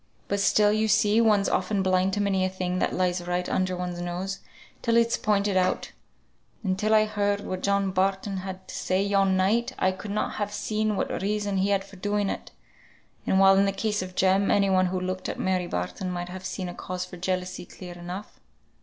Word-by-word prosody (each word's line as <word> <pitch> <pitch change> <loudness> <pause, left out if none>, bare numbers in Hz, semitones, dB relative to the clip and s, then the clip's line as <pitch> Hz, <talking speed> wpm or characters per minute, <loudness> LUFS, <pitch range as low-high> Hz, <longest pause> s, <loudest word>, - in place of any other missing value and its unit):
But 200 - -1
still, 205 +1 +4
you 215 +1 +1
see, 215 +1 +4
one's 210 -3 +4
often 200 -3 0
blind 185 0 +2
to 205 - 0
many 195 -2 +1
a 185 - +1
thing 185 -1 -2
that - - +1
lies 180 -1 -1
right 180 0 -1
under 185 -1 0
one's 180 -1 -4
nose, 180 +3 -3 0.4
till 230 0 +2
it's 235 0 +3
pointed 205 -2 +1
out. 185 0 +1 0.7
And 190 -3 +1
till 215 +1 +3
I 215 0 +5
heard 205 -1 0
what 185 -2 -4
John 200 -1 +1
Barton 195 +1 0
had 190 0 -7
to - - -9
say 185 +1 0
yon 195 -1 +2
night, 215 +6 +1
I 185 - +2
could 190 +3 -8
not 210 +1 -2
have 205 -1 -2
seen 215 +1 -1
what - - -2
reason 205 0 -1
he 190 +1 +1
had 195 -1 +1
for 195 - -14
doing 205 +1 0
it; - - -6 0.8
while 195 0 +5
in 200 - +4
the 195 - +1
case 210 +1 -1
of 185 0 -7
Jem, 190 +1 +3
any 200 -1 +3
one 185 0 +4
who 185 +1 -2
looked 185 0 -3
at - - -4
Mary 185 -1 0
Barton 90 - -3
might 175 0 -4
have 185 +1 -8
seen 185 0 -4
a 175 - -5
cause 185 0 -5
for 180 -1 -10
jealousy, 185 0 -3
clear 180 -2 -9
enough." 175 +4 -8
190 Hz, 215 wpm, -26 LUFS, 185-205 Hz, 0.8 s, I